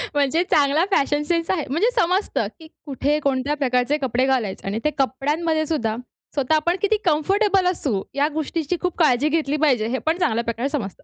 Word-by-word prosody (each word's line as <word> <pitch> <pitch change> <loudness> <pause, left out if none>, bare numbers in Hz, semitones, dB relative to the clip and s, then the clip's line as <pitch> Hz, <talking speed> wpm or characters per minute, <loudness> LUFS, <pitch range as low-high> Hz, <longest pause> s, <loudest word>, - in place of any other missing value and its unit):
म्हणजे 290 +4 +2
चांगला 295 +3 +3
fashion 290 -3 +1
sense 335 -1 0
आहे. 345 -6 -1
म्हणजे 335 - +2
समजतं, 370 +4 +1
की 320 - -12 0.2
कुठे 290 +1 0
कोणत्या 275 +1 0
प्रकारचे 250 +2 +1
कपडे 255 0 +1
घालायचे 240 -9 -1
आणि 205 +3 -2
ते 300 - +2
कपड्यांमध्ये 300 +4 0
सुद्धा, 230 -9 -1 0.4
स्वतः 280 +2 +1
आपण 340 +3 +1
किती 420 +1 +2
कंफर्टेबल 385 +4 +2
असू 255 - -2
या 285 +1 +2
गोष्टींची 315 +2 -2
खूप 360 -2 -2
काळजी 295 -2 +3
घेतली 300 -2 0
पाहिजे, 240 -7 +2
हे 255 - -1
पण 320 +2 +2
चांगल्या 235 -10 0
प्रकारे 235 +4 -2
समजतं. 230 - -5
290 Hz, 180 wpm, -22 LUFS, 260-330 Hz, 0.4 s, चांगला